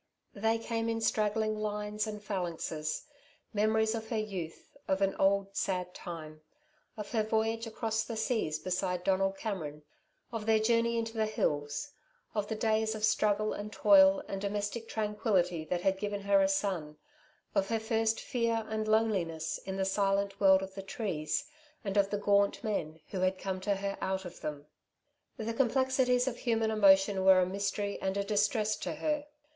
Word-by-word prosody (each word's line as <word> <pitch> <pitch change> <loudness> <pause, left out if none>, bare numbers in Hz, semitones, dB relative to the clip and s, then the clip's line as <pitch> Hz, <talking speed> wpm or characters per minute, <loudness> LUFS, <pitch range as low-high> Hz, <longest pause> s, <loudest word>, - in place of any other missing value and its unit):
They 225 +2 +1
came 225 0 -2
in 225 0 -1
straggling 215 0 +1
lines 210 0 -2
and 210 -1 -6
phalanxes 170 - -3 0.5
memories 220 +1 +2
of 220 -1 -5
her 225 - -1
youth, 190 -7 -5
of 190 0 +1
an 195 0 +2
old 195 0 +2
sad 180 -2 -1
time, 155 -3 -8 0.6
of 210 -1 -6
her 225 -3 +2
voyage 225 +1 0
across 220 0 -1
the 230 - -5
seas 220 -9 0
beside 180 +1 -2
Donald 195 0 +1
Cameron, 160 -9 -4 0.5
of 225 -2 -5
their 220 -1 +5
journey 230 +1 +2
into 225 0 -2
the 220 -1 0
hills, 145 - -1 0.4
of 210 -1 -1
the 220 - -2
days 220 0 +1
of 215 0 +1
struggle 215 0 +2
and 205 +1 -6
toil 195 -2 +6
and 195 -1 -4
domestic 205 +3 -3
tranquility 210 -6 0
that 175 +2 -2
had 190 +1 +1
given 205 0 -3
her 200 0 +4
a 195 - +4
son, 185 -6 -1 0.6
of 195 -1 +2
her 225 -1 +1
first 225 0 +1
fear 230 -3 -1
and 215 0 -2
loneliness 190 -8 +1
in 190 0 -3
the 190 - 0
silent 195 0 +1
world 190 -1 +6
of 190 0 -7
the 195 - -6
trees, 190 - -2 0.4
and 200 -2 -3
of 200 -1 +3
the 205 - -1
gaunt 200 0 +2
men 160 -7 -2
who 190 - -4
had 185 +1 +1
come 185 -1 -4
to 200 +1 +1
her 195 0 -3
out 190 0 -2
of 180 - -9
them. 150 -1 -5 0.7
The 225 +1 -3
complexities 260 0 +2
of 245 -2 -2
human 225 -2 +1
emotion 195 -2 +5
were 190 -1 +7
a 180 - +4
mystery 200 +2 -2
and 190 +1 -1
a 200 - +1
distress 210 +1 +1
to - - -4
her. 300 -1 -1
205 Hz, 175 wpm, -31 LUFS, 190-220 Hz, 0.7 s, were